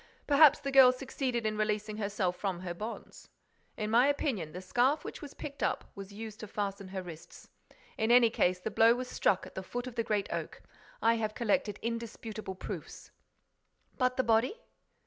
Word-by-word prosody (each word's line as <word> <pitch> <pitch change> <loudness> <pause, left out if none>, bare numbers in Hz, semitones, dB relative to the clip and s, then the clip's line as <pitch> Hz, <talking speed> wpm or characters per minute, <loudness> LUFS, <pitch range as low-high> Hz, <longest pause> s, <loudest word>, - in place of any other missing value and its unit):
Perhaps 290 0 +6
the 275 -1 -3
girl 265 -2 +8
succeeded 255 -2 -3
in 215 0 -1
releasing 215 0 -1
herself 200 -3 -1
from 185 -2 -3
her 180 -2 -4
bonds. 215 +6 -8 0.5
In 215 0 -2
my 240 +4 +5
opinion, 255 - -1
the 180 - -7
scarf 250 +10 +1
which - - -7
was 290 -2 -9
picked 285 -1 -8
up - - -1
was 195 0 -9
used 215 +1 -8
to 215 - -7
fasten 200 -1 -4
her 190 0 -5
wrists. 165 -3 -11 0.5
In 220 +1 +1
any 240 -1 +6
case, 180 -4 +2
the - - -4
blow 230 +1 +5
was 250 0 -4
struck 195 -5 +1
at - - -12
the 190 - -4
foot 245 +6 -5
of 255 - -7
the 230 -1 -1
Great 210 -2 0
Oak. - - -5 0.4
I 230 +1 +4
have 215 -1 -2
collected 210 -2 0
indisputable 225 -3 -5
proofs—" - - -8 0.9
"But 255 0 +2
the 260 - +3
body?" 235 - +2
220 Hz, 185 wpm, -31 LUFS, 200-250 Hz, 0.9 s, girl